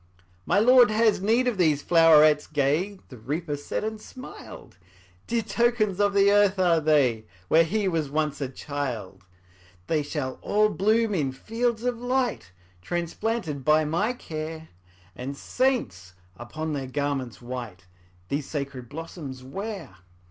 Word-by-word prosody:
``My 205 Hz, +2 st, +4 dB
Lord 250 Hz, -2 st, +7 dB
has 215 Hz, -2 st, +2 dB
need 230 Hz, +5 st, +2 dB
of 230 Hz, -6 st, -1 dB
these 155 Hz, -5 st, +2 dB
flowerets 155 Hz, -3 st, +5 dB
gay,'' 155 Hz, +8 st, 0 dB
The 125 Hz, -, -11 dB
Reaper 145 Hz, +6 st, -3 dB
said, 145 Hz, -, -4 dB
and 220 Hz, 0 st, -4 dB
smiled; 255 Hz, -, -11 dB, 0.5 s
``Dear 230 Hz, -2 st, -1 dB
tokens 235 Hz, -5 st, +1 dB
of 205 Hz, -1 st, +2 dB
the 200 Hz, 0 st, +5 dB
earth 205 Hz, -1 st, +4 dB
are 175 Hz, -3 st, +3 dB
they, 135 Hz, -8 st, +2 dB, 0.2 s
Where 165 Hz, +1 st, +6 dB
he 200 Hz, +4 st, -1 dB
was 160 Hz, -5 st, -1 dB
once 150 Hz, 0 st, -1 dB
a 135 Hz, -, -2 dB
child. 120 Hz, -10 st, -5 dB, 0.6 s
``They 155 Hz, -2 st, +1 dB
shall 145 Hz, -3 st, -4 dB
all 210 Hz, +1 st, +2 dB
bloom 215 Hz, +2 st, +1 dB
in 145 Hz, -8 st, 0 dB
fields 225 Hz, -, -2 dB
of 245 Hz, -2 st, -1 dB
light, 245 Hz, -, -1 dB, 0.3 s
Transplanted 175 Hz, -, -3 dB
by 155 Hz, +2 st, +4 dB
my 175 Hz, +10 st, 0 dB
care, 160 Hz, -6 st, -7 dB, 0.5 s
And 135 Hz, +3 st, -6 dB
saints, 95 Hz, -, -1 dB, 0.2 s
upon 155 Hz, +9 st, -5 dB
their 135 Hz, -2 st, -3 dB
garments 135 Hz, -3 st, -3 dB
white, 120 Hz, -7 st, -7 dB, 0.4 s
These 145 Hz, 0 st, -3 dB
sacred 140 Hz, -5 st, -5 dB
blossoms 145 Hz, -4 st, -8 dB
wear.'' 195 Hz, +7 st, -7 dB
160 Hz, 140 wpm, -26 LUFS, 140-210 Hz, 0.6 s, Lord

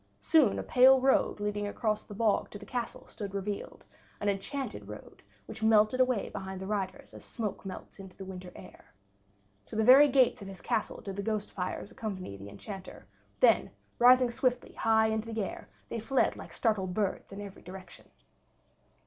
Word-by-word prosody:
Soon 315 Hz, -4 st, +4 dB
a -, -, -3 dB
pale 260 Hz, +1 st, +6 dB
road 265 Hz, -4 st, +2 dB
leading 205 Hz, 0 st, -2 dB
across 215 Hz, 0 st, -1 dB
the 205 Hz, -, -11 dB
bog 215 Hz, -1 st, +1 dB
to -, -, -8 dB
the 205 Hz, -, -11 dB
castle 245 Hz, -2 st, -4 dB
stood 200 Hz, -2 st, -7 dB
revealed, 200 Hz, +1 st, -5 dB, 0.3 s
an 205 Hz, -, 0 dB
enchanted 200 Hz, -, -4 dB
road 105 Hz, 0 st, -11 dB, 0.2 s
which -, -, -9 dB
melted 220 Hz, +2 st, +4 dB
away 255 Hz, -5 st, +2 dB
behind 190 Hz, -1 st, -6 dB
the 190 Hz, -, -6 dB
riders 205 Hz, +7 st, -4 dB
as -, -, -11 dB
smoke 215 Hz, -5 st, -5 dB
melts 190 Hz, -, -9 dB
into 190 Hz, -1 st, -11 dB
the 190 Hz, -, -8 dB
winter 185 Hz, -1 st, -8 dB
air. 185 Hz, -, -14 dB, 0.7 s
To -, -, -9 dB
the 220 Hz, -, +2 dB
very 265 Hz, +5 st, +9 dB
gates 260 Hz, -4 st, +3 dB
of 200 Hz, -, -8 dB
his 195 Hz, -2 st, -9 dB
castle 230 Hz, -3 st, -2 dB
did 195 Hz, -1 st, -7 dB
the -, -, -1 dB
ghost 215 Hz, 0 st, -2 dB
fires 180 Hz, -1 st, -4 dB
accompany 190 Hz, -, -5 dB
the 100 Hz, +1 st, -10 dB
Enchanter; 190 Hz, -, -9 dB, 0.4 s
then, -, -, +5 dB, 0.3 s
rising 250 Hz, 0 st, +6 dB
swiftly 250 Hz, +1 st, -1 dB
high 220 Hz, 0 st, +3 dB
into 220 Hz, +1 st, -1 dB
the 220 Hz, -2 st, -1 dB
air, -, -, -7 dB, 0.2 s
they 230 Hz, -, -4 dB
fled 265 Hz, +4 st, +1 dB
like -, -, -10 dB
startled 190 Hz, -6 st, 0 dB
birds, 205 Hz, -2 st, -2 dB
in 200 Hz, -, -8 dB
every 200 Hz, -1 st, -9 dB
direction. 185 Hz, 0 st, -11 dB
210 Hz, 185 wpm, -30 LUFS, 195-235 Hz, 0.7 s, very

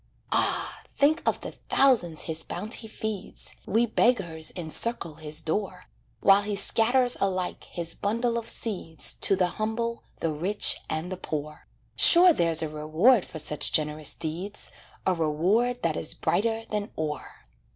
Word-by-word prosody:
Ah! -, -, 0 dB
think 300 Hz, +3 st, +2 dB
of -, -, 0 dB
the -, -, -6 dB
thousands 225 Hz, -, +1 dB
his 160 Hz, -1 st, -4 dB
bounty 210 Hz, +7 st, -4 dB
feeds 215 Hz, -2 st, -7 dB
We 225 Hz, +4 st, +1 dB
beggars 190 Hz, -9 st, 0 dB
encircle 170 Hz, +1 st, 0 dB
his 155 Hz, 0 st, -2 dB
door, 180 Hz, +2 st, -4 dB, 0.4 s
While 195 Hz, 0 st, +5 dB
he 205 Hz, 0 st, -3 dB
scatters 245 Hz, +5 st, +5 dB
alike 185 Hz, -2 st, -3 dB
his 170 Hz, -1 st, -4 dB
bundle 235 Hz, +3 st, -2 dB
of 230 Hz, -, -9 dB
seeds 180 Hz, -8 st, -1 dB
To 195 Hz, -, +5 dB
the 185 Hz, -1 st, +1 dB, 0.2 s
humble, 230 Hz, +2 st, -3 dB
the 165 Hz, -, -3 dB
rich, 180 Hz, +8 st, +2 dB
and 160 Hz, +3 st, -4 dB
the 185 Hz, -, -5 dB
poor. 150 Hz, -3 st, -7 dB, 0.3 s
Sure 355 Hz, 0 st, +9 dB
there's 165 Hz, -, +2 dB
a -, -, -2 dB
reward 155 Hz, +10 st, +2 dB
for -, -, -10 dB
such 150 Hz, -1 st, +1 dB
generous 150 Hz, -1 st, -1 dB
deeds, 175 Hz, +6 st, -5 dB, 0.3 s
A 185 Hz, -, +2 dB
reward 185 Hz, -, -1 dB
that -, -, 0 dB
is -, -, -4 dB
brighter 225 Hz, +1 st, -1 dB
than 210 Hz, -1 st, -3 dB
ore! 150 Hz, -, -7 dB
190 Hz, 150 wpm, -25 LUFS, 160-225 Hz, 0.4 s, Sure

